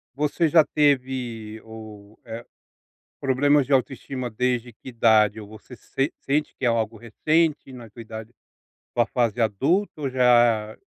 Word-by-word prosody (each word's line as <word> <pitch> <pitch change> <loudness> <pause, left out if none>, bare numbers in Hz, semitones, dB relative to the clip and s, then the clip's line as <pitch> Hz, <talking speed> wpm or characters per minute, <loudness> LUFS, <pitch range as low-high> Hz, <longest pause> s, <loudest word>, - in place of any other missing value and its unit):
Você 150 +3 0
já 160 0 +6
teve 125 -6 -1
o, 110 -1 -12
eh, 115 +1 -8 0.8
problemas 140 +1 +3
de 140 - -4
autoestima 130 -1 -1
desde 125 +1 -1
que 110 - -14
idade? 110 -2 +3
Ou 105 - -10
você 110 +4 -13
sen 135 +6 -2
sente 150 +2 -1
que 130 - -6
é - - +4
algo 115 -1 -1
recente 155 +5 0
na 120 -3 -11
sua 115 +3 -11
idade, 110 +1 -9 0.6
ou 120 - +3
a - - -1
fase 120 -2 -1
adulta 145 - 0
ou 135 -2 -2
já 120 -4 +3
120 Hz, 155 wpm, -24 LUFS, 110-135 Hz, 0.8 s, já